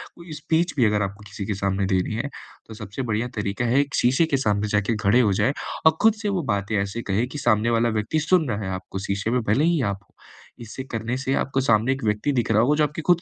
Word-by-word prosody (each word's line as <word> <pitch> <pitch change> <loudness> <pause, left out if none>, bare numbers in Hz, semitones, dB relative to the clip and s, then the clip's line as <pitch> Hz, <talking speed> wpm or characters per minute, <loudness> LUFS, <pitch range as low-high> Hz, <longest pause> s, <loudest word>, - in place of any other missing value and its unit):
कोई 170 -1 -12
स्पीच 165 +3 0
भी 125 - +4
अगर 105 -1 +2
आपको 100 +1 -6
किसी 100 0 -6
के 105 - -1
सामने 100 0 -1
देनी 95 +3 0
है, 135 +6 -3 0.4
तो 110 - -9
सबसे 105 +3 -6
बढ़िया 110 +3 0
तरीका 105 +3 -2
है, 120 +4 +3
एक 145 -1 -4
शीशे 130 +7 +3
के 140 - +5
सामने 105 -4 0
जाके 105 +2 +1
खड़े 105 +5 +4
हो 105 -5 +2
जाएँ 135 +8 +1 0.3
और 160 0 +5
खुद 220 0 +6
से 210 - -1
वो 190 -4 -1
बातें 100 +2 -2
ऐसे 100 +4 -4
कहें 110 +5 +1
कि 150 - -8
सामने 115 -4 +2
वाला 115 0 +2
व्यक्ति 110 +7 -1
सुन 160 -2 +2
रहा 110 -1 -2
है - - -3
आपको, 95 +1 -7
शीशे 100 +3 -2
में 125 0 +1
भले 110 +6 +1
ही 170 -3 +2
आप 100 - -10
हो। - - -36 0.5
इसे 115 +4 -7
करने 115 +2 -2
से 135 0 -2
आपको 135 0 -1
सामने 115 0 +2
एक 135 - -7
व्यक्ति 105 +6 0
दिख 120 -3 0
रहा 110 0 +4
होगा 140 +5 +3
जो 155 - +3
आपकी 150 +2 -5
खुद 175 -1 +5
115 Hz, 260 wpm, -23 LUFS, 105-140 Hz, 0.5 s, खुद